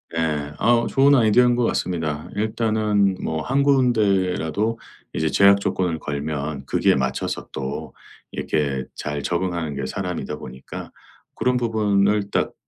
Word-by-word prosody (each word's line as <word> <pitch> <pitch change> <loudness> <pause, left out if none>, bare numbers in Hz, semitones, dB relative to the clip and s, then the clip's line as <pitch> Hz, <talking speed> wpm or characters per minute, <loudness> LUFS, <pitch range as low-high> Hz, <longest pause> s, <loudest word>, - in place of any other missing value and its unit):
예. 75 -3 -1
어 120 +1 +3
좋은 140 +1 +4
아이디어인 120 +1 +4
것 120 - +2
같습니다. 80 -8 -2
일단은 105 -2 +1
뭐 80 -1 -2
1 135 - +1
군데라도 110 - +1 0.3
이제 80 - 0
제약 100 +2 +5
조건을 95 -4 -1
걸면 75 -1 -4
거기에 - - +2
맞춰서 65 -1 -2
또 65 0 -5 0.4
이렇게 70 -4 -1
잘 75 -1 -4
적응하는 85 -3 -2
게 70 -1 -3
사람이다 90 +5 -4
보니까 65 +1 -9 0.4
그런 125 0 +1
부분을 105 -3 +1
딱 - - 0
95 Hz, 285 characters per minute, -22 LUFS, 75-110 Hz, 0.4 s, 제약